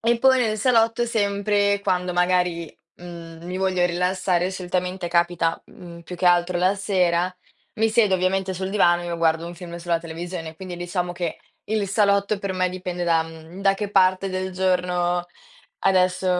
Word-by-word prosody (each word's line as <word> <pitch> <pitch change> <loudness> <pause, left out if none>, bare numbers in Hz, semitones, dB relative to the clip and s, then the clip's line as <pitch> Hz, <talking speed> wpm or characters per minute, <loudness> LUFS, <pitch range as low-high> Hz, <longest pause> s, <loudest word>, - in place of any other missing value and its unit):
e 235 +1 +2
poi 260 +1 +5
nel 220 -3 +1
salotto, 230 0 +3
sempre 200 -2 +1
quando 180 -2 0
magari, 180 -2 +1 0.3
mhmm, 170 -1 -10
mi 180 +1 -4
voglio 185 -2 +1
rilassare, 180 0 0
solitamente 180 0 -3
capita, 170 -1 +1
mhmm, 170 -1 -12
più 180 - -8
che 180 - -3
altro 175 0 +3
la 185 +3 +2
sera, 180 -3 +1 0.4
mi 225 +1 +2
siedo 220 -3 +3
ovviamente 190 +1 0
sul 190 +1 -4
divano 175 -4 +3
e 175 - -6
io 170 - -3
guardo 165 0 +1
un 175 - -7
film 175 -1 -9
sulla 170 -1 -1
televisione. 165 0 -6
Quindi, 180 +1 -8
diciamo, 175 0 -3
che 175 -1 -4 0.3
il 215 -1 -1
salotto 200 0 +2
per 195 -1 -3
me, 185 0 +1
dipende 180 -1 -5
da, 165 -1 +3
mhmm, 165 +3 -11
da 195 0 +3
che 205 0 -4
parte 185 -1 +3
del 185 0 -3
giorno 180 -1 0 0.5
adesso 185 -1 +2
180 Hz, 170 wpm, -23 LUFS, 175-195 Hz, 0.5 s, poi